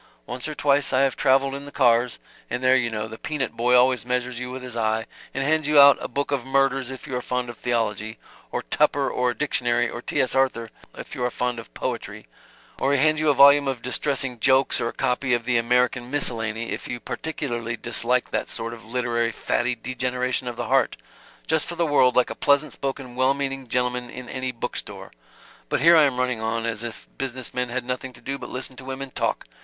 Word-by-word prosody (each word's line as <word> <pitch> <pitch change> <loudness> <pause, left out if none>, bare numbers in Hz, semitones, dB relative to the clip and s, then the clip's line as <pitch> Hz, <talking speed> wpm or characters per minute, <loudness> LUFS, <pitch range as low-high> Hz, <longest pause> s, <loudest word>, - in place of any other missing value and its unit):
Once 125 +3 -6
or 155 - -5
twice 145 0 +2
I 130 - +3
have 135 -2 +2
traveled 135 +1 +3
in 140 +1 -6
the 145 - -10
cars 120 -1 +3 0.3
and 125 +2 -3
there 130 0 +5
you 120 -2 +2
know, 110 -1 -3
the 110 0 -10
peanut 150 -3 -2
boy 120 +2 +2
always 125 -2 +4
measures 125 0 -2
you 125 0 -5
with 130 0 -7
his 125 -2 -7
eye, 110 -1 0 0.3
and 135 - -2
hands 155 +1 +1
you 150 -1 +5
out 140 -1 +8
a - - -3
book 140 +3 -3
of 140 -4 0
murders 135 -1 +1
if 130 -2 -8
you 130 - -5
are 125 - -1
fond 125 0 -2
of 120 - -8
theology; 110 -2 -1 0.3
or - - -2
Tupper 145 -2 +1
or 125 0 +1
a 120 - -3
dictionary 120 -4 +1
or 120 - -6
T. - - -2
S. 130 - +2
Arthur 130 -4 +1 0.3
if - - -9
you - - -3
are 125 - +2
fond 125 0 -2
of 115 - -11
poetry; - - -4 0.5
or 140 - +2
he - - +3
hands 155 +3 +3
you 155 0 +2
a 145 - +4
volume 140 +1 +7
of 130 -3 -3
distressing 130 -1 -1
jokes 135 +2 +3
or - - 0
a - - -2
copy 125 0 +1
of 120 -1 -4
the 125 -1 +2
American 125 +1 +1
Miscellany 115 -5 -1
if - - -4
you 120 - -4
particularly 120 -4 -4
dislike 120 +1 -1
that - - -2
sort 115 +1 -5
of 115 - -11
literary 115 0 -1
fatty 125 +2 -1
degeneration 125 +1 -2
of 120 - -4
the - - -4
heart - - +2 0.5
just 160 -1 +1
for 170 - -5
the 170 0 +1
world 130 -5 +4
like 125 - +3
a - - -2
pleasant 140 0 +2
spoken 135 -2 -5
well 130 +2 +3
meaning 135 -2 -3
gentleman 125 0 -1
in 125 0 -8
any 130 0 -3
bookstore. 115 - -5 0.6
But - - +1
here 170 +3 +7
I 155 -2 +7
am 135 -3 0
running 125 -3 0
on 115 +1 -1
as 115 -2 -2
if 120 -1 -8
business 130 -2 -4
men 125 -1 -1
had 125 +1 -3
nothing 125 +1 -4
to - - -14
do 135 +1 -4
but - - -8
listen 130 +1 -3
to 130 - -10
women 135 0 -5
talk. - - -1
125 Hz, 230 wpm, -24 LUFS, 120-135 Hz, 0.6 s, out